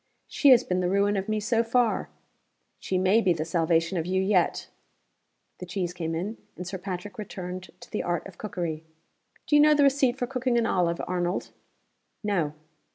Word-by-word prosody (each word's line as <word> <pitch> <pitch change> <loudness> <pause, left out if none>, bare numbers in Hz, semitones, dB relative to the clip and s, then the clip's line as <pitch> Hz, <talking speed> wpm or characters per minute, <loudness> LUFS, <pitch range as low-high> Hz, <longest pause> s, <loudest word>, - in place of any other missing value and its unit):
"She 285 - +3
has 250 -2 +7
been 180 -5 -1
the 180 -1 0
ruin 200 +2 +2
of 195 +1 -2
me 215 0 +1
so 225 +2 +1
far." 235 0 +1 0.7
"She 185 - -2
may 190 +5 +4
be 185 -5 +3
the 160 -1 -3
salvation 165 +1 +1
of 160 - -3
you 190 +1 +1
yet." 190 -2 +1 0.9
The 180 - -6
cheese 180 -1 -3
came 165 -2 -3
in; 200 +7 -3 0.2
and 180 - -7
Sir 190 +1 -5
Patrick 185 +2 -6
returned 185 -2 -6
to - - -13
the 215 - -1
Art 175 0 -2
of 195 -2 -12
Cookery. 175 -7 -4 0.6
"Do 295 - +2
you 295 - +7
know 300 0 +6
the 290 - +4
receipt 270 -2 +3
for 250 - -1
cooking 255 -1 0
an 235 - +2
olive, 175 -5 +1
Arnold?" 175 0 -2 0.7
"No." 175 -8 0
190 Hz, 190 wpm, -27 LUFS, 175-225 Hz, 0.9 s, has